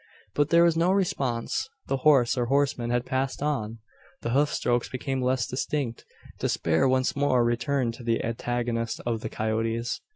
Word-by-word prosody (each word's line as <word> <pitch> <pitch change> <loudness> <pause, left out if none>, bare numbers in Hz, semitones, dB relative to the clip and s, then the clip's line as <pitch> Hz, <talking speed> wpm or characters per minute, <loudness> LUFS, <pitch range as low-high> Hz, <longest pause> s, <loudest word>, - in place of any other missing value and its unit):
But 145 0 +1
there 170 0 +6
was 170 -1 +4
no 170 +3 +3
response. 175 - -1 0.2
The 135 - -1
horse, 130 -3 +4
or 120 -2 0
horseman, 135 -3 +1
had 120 0 0
passed 130 +1 -2
on. 115 -7 -2 0.5
The 115 - -1
hoof 145 +3 +3
strokes 120 -1 0
became 130 +1 -3
less 125 -2 +1
distinct. 130 -1 -3 0.3
Despair 80 +10 +1
once 130 0 +1
more 140 -3 +3
returned 120 +1 0
to 120 - -11
the 115 -1 0
antagonist 115 0 -2
of 115 -2 -1
the 110 - -4
coyotes. 115 +2 -2
125 Hz, 165 wpm, -26 LUFS, 115-140 Hz, 0.5 s, there